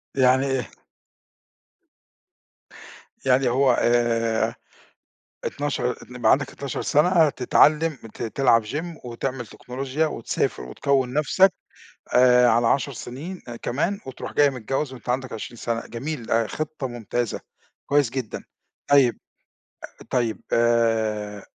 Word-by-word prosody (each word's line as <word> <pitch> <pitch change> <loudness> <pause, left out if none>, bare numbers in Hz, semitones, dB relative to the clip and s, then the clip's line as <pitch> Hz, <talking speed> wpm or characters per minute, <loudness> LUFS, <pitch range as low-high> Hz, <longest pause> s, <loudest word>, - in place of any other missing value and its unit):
يعني 130 0 +4
آآ - - 0
ه 110 - -14 2.5
يعني 130 -1 +3
هو 130 +1 +3 1.7
12 145 -4 -1
إن 125 - -13
يبقى 120 - +4
عندك 145 - +1
12 140 -2 -5
سَنة 165 +1 +4
تتعلم 155 +5 +3 0.2
ت - - -7
تلعب 115 -1 +3
gym 160 +6 -5
وتعمل 120 +1 -4
تكنولوجيا 135 +7 -3
وتسافر 115 - -2
وتكوّن 130 - 0
نَفسك 180 +6 +4 0.6
آآ، 125 0 +6
على 115 +1 +3
10 140 +1 +1
سنين 155 +11 -7
آآ 120 - -6
كمان 165 +12 -2
وتروح 130 - -7
جاي 145 -1 +5
متجوّز 135 +2 -3
وأنت 125 -1 -11
عندك 130 +1 -1
20 115 +2 -7
سَنة، 115 0 -2
جميل 125 +1 -5
آآ، 115 -1 +2
خطة 155 -1 -4
ممتازة، 120 -1 -3 0.5
كويس 145 -4 +2
جدًا، 130 -4 -5 0.5
طيب 135 -4 +4 0.7
أ - - -17
طيب 120 -4 0
آآ، 110 -3 +1
130 Hz, 120 wpm, -24 LUFS, 120-145 Hz, 2.5 s, آآ